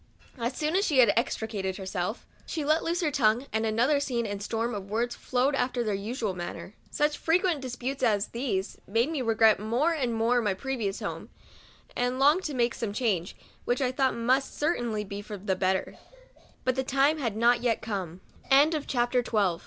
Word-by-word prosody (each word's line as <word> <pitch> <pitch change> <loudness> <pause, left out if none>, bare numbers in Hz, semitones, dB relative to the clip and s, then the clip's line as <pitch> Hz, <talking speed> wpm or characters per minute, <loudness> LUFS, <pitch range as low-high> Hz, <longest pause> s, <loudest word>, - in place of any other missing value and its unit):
As 240 +2 -2
soon 310 +2 0
as 390 - +3
she 305 -9 +1
had 250 -2 +6
extricated 215 -5 -2
herself, 190 +2 -4 0.2
she 310 -3 -3
let 310 +2 +2
loose 345 +2 -1
her 310 -3 +1
tongue, 240 -1 +2
and 220 0 +1
another 240 +7 +2
scene 245 -5 -1
and 205 -1 -4
storm 230 +3 -2
of 200 -2 -6
words 235 +3 -1
followed 260 +3 0
after 250 -2 0
their 215 -2 -1
usual 210 +1 -2
manner. 175 +2 -7 0.2
Such 295 0 0
frequent 340 -2 +2
disputes 260 +1 -4
as 210 -4 +2
these 230 -6 -3
made 230 +9 +1
me 305 -5 -2
regret 225 -3 +4
more 240 +11 +1
and 250 -7 -1
more 235 +2 +2
my 205 -4 0
previous 225 -3 -3
home, - - -5 0.7
and 245 +1 0
long 290 +6 +5
to 300 -6 -4
make 240 -1 +2
some 215 -3 -4
change, 205 -7 -1 0.3
which 245 - 0
I 255 -2 +1
thought 265 0 +1 0.3
must - - -12
certainly 240 -9 0
be 200 0 -6
for 205 -1 -8
240 Hz, 155 wpm, -28 LUFS, 215-275 Hz, 0.7 s, had